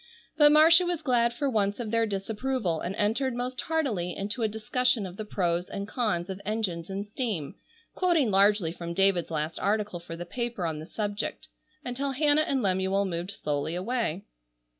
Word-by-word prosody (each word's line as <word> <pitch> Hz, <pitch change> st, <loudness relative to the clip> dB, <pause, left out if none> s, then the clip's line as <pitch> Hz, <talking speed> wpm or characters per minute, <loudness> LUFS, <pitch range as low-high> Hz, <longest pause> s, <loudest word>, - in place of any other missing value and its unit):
But 295 Hz, -1 st, +7 dB
Marcia 320 Hz, +4 st, +8 dB
was 350 Hz, -3 st, -2 dB
glad 235 Hz, -3 st, +2 dB
for 280 Hz, +4 st, -2 dB
once 205 Hz, -4 st, 0 dB
of 225 Hz, -3 st, -4 dB
their 230 Hz, 0 st, +2 dB
disapproval 210 Hz, -2 st, -2 dB
and 185 Hz, +3 st, -4 dB
entered 235 Hz, +5 st, 0 dB
most 250 Hz, +1 st, -3 dB
heartily 230 Hz, -, -1 dB
into 205 Hz, +5 st, -3 dB
a 220 Hz, -, +2 dB
discussion 220 Hz, +1 st, 0 dB
of 180 Hz, -1 st, -8 dB
the 215 Hz, -, -6 dB
pros 175 Hz, -4 st, -1 dB
and 200 Hz, 0 st, -5 dB
cons 210 Hz, -9 st, -1 dB
of 190 Hz, 0 st, -6 dB
engines 195 Hz, -6 st, -2 dB
and 195 Hz, +1 st, -4 dB
steam, 205 Hz, -, -3 dB, 0.4 s
quoting 335 Hz, -, +2 dB
largely 195 Hz, -3 st, +4 dB
from 170 Hz, 0 st, -6 dB
David's 195 Hz, -2 st, +3 dB
last 155 Hz, 0 st, -2 dB
article 210 Hz, -3 st, -1 dB
for 170 Hz, -1 st, -8 dB
the 175 Hz, +1 st, -6 dB
paper 235 Hz, -1 st, -3 dB
on 160 Hz, -2 st, -3 dB
the 155 Hz, -, -9 dB
subject, 205 Hz, 0 st, -4 dB, 0.4 s
until 270 Hz, +3 st, -2 dB
Hannah 295 Hz, +2 st, +3 dB
and 275 Hz, -5 st, 0 dB
Lemuel 190 Hz, +1 st, +1 dB
moved 175 Hz, -1 st, -4 dB
slowly 150 Hz, -4 st, -2 dB
away. 200 Hz, -2 st, -2 dB
210 Hz, 180 wpm, -27 LUFS, 180-250 Hz, 0.4 s, Marcia